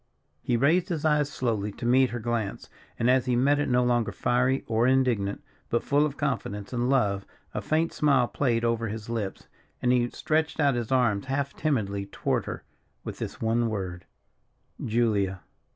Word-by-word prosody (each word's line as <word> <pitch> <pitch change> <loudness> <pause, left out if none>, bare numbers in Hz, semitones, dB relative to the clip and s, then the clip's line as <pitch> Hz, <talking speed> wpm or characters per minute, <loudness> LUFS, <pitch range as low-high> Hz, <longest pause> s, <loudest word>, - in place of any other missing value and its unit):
He 120 - 0
raised 165 - +3
his 160 -3 -2
eyes 150 -2 +3
slowly 110 -6 -1
to 120 - -7
meet 130 +2 +4
her 120 - -4
glance, 115 -3 -3 0.3
and 115 - +1
as 130 0 +3
he 125 - +2
met 140 +4 +3
it 145 - 0
no 125 0 +3
longer 120 -2 +1
fiery 125 +2 +1
or 115 +1 +2
indignant, 125 -7 +1 0.3
but 115 - 0
full 145 +1 +3
of 140 - -8
confidence 105 -7 -3
and 120 +1 0
love, 100 -8 +2 0.3
a - - -2
faint 160 +2 0
smile 135 -5 +3
played 120 -4 0
over 115 -1 0
his 110 +1 -6
lips, 110 -5 -4 0.3
and 125 - +2
he 120 -1 +2
stretched 160 +3 -1
out 140 -2 +4
his 120 -1 -3
arms 120 -4 +2
half 140 +1 -2
timidly 100 -10 -1
toward - - -1
her, - - -6 0.4
with - - -7
this - - -5
one 115 +1 +1
word: 95 -5 -4 0.8
"Julia!" 105 -5 +1
120 Hz, 180 wpm, -27 LUFS, 110-135 Hz, 0.8 s, meet